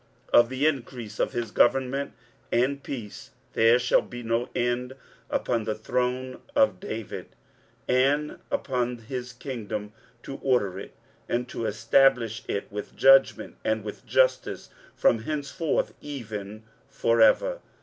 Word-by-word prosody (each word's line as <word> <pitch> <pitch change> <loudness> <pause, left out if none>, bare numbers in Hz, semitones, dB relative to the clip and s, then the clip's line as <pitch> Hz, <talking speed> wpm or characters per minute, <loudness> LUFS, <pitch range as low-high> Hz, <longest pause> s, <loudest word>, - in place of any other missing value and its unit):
23:009:007 - - +9
Of 120 0 +4
the 130 +3 -1
increase 120 -7 -2
of - - +1
his 120 -1 -3
government 135 +2 +2 0.4
and 135 +4 +1
peace 115 -8 -7 0.2
there 115 +2 +5
shall 125 0 +3
be 120 0 -9
no 115 +2 -1
end, 120 +1 -1 0.4
upon 115 -2 0
the 110 - -1
throne 125 +3 -2
of 275 -1 +3
David, 115 - -6 0.6
and 140 +4 +2
upon 125 -2 -1
his 125 +2 -6
kingdom, 110 -5 -5 0.3
to 135 - -6
order 100 -8 +1
it, - - -10 0.3
and 120 +1 0
to 115 - -3
establish 115 0 +3
it 100 - -2
with 105 0 -6
judgment 135 0 +5
and 110 -1 0
with 105 - -7
justice - - +1 0.2
from 115 - +3
henceforth 150 +5 -2
even 110 -7 -7 0.3
for 115 0 +1
ever. - - +4
125 Hz, 135 wpm, -26 LUFS, 110-135 Hz, 0.6 s, 23:009:007